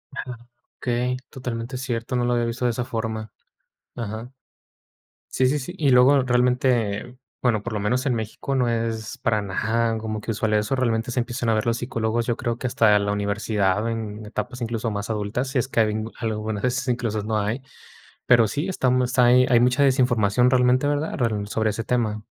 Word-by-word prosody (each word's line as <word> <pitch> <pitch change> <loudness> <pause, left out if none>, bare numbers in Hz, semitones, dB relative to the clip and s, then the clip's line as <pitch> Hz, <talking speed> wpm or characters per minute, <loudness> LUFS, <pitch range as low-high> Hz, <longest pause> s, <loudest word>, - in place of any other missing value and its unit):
Ajá, 125 -4 -5 0.4
okey, 125 +1 -1
totalmente 125 -1 -5
cierto, 125 -2 -3
no 125 - +1
lo 120 - +1
había 120 -1 +1
visto 115 +2 -2
de 120 - +3
esa 120 +1 -3
forma. 110 -1 -4 0.6
Ajá. 115 +2 -5 1.0
Sí, 130 - +3
sí, 145 +3 +1
sí, 145 +6 -6
y 145 - +3
luego 130 +2 +6
realmente, 125 -2 +1 0.2
bueno, 110 -5 +1
por 120 -1 -4
lo 105 - -1
menos 125 +6 0
en 130 - +2
México, 110 +4 -4
no 125 -3 +2
es 115 +1 -2
para 110 -4 0
nada 115 +3 0
como 110 -1 -4
que 115 - -9
usual 110 0 0
eso, 105 +5 +1
realmente 115 -2 0
se 125 - -1
empiezan 120 0 -2
a 110 - +3
ver 110 - 0
los 115 0 +1
psicólogos, 115 -1 -1
yo 120 - 0
creo 120 0 -2
que 125 - -2
hasta 105 -3 +4
la 100 0 -1
universidad, 100 0 0
en 110 -2 -4
etapas 110 +3 -5
incluso 115 0 -2
más 100 +1 -4
adultas, 110 +4 -2
si 135 +1 -2
es 125 +1 +1
que 120 - -1
a - - +7
habien 110 0 -1
algún 110 -2 -2
a - - -8
veces, 130 +2 -1
incluso 115 -4 -1
no 110 0 0
hay. 110 +6 -2 0.6
Pero 120 -3 +6
sí, 145 - -2
estamos 125 -6 +1
hay 125 +1 +6
hay 120 - +5
mucha 125 +3 +3
desinformación 125 -3 +3
realmente, 125 +1 +3
¿verdad?, 145 +2 -1
rel 110 -5 -1
sobre 110 +1 0
ese 115 +2 -4
tema. 110 -3 -1
115 Hz, 200 wpm, -23 LUFS, 110-125 Hz, 1.0 s, a